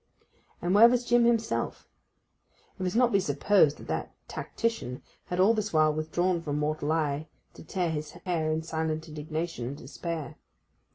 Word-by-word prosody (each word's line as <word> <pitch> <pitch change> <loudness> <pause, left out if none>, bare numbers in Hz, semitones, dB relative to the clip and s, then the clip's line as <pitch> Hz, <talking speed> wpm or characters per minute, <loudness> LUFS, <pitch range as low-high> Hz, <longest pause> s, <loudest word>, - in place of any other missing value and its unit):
And 175 +1 +1
where 225 +4 +9
was 245 0 +1
Jim 240 0 +4
himself? 230 -1 0 0.9
It - - -13
must 185 +1 -1
not 245 0 +4
be 200 - +4
supposed 155 0 +3
that - - -11
that - - -4
tactician 225 - -3 0.2
had 180 - -3
all 200 +5 +6
this 215 -2 -2
while 155 -1 +4
withdrawn 170 +3 0
from 150 -3 -2
mortal 150 0 -1
eye 155 -1 0 0.3
to - - -12
tear 175 +1 -1
his 150 -1 -3 0.2
hair 165 -4 0
in 160 +1 -1
silent 160 0 -2
indignation 155 -3 -4
and 140 +3 -5
despair. 155 +3 -6
160 Hz, 165 wpm, -28 LUFS, 155-195 Hz, 0.9 s, where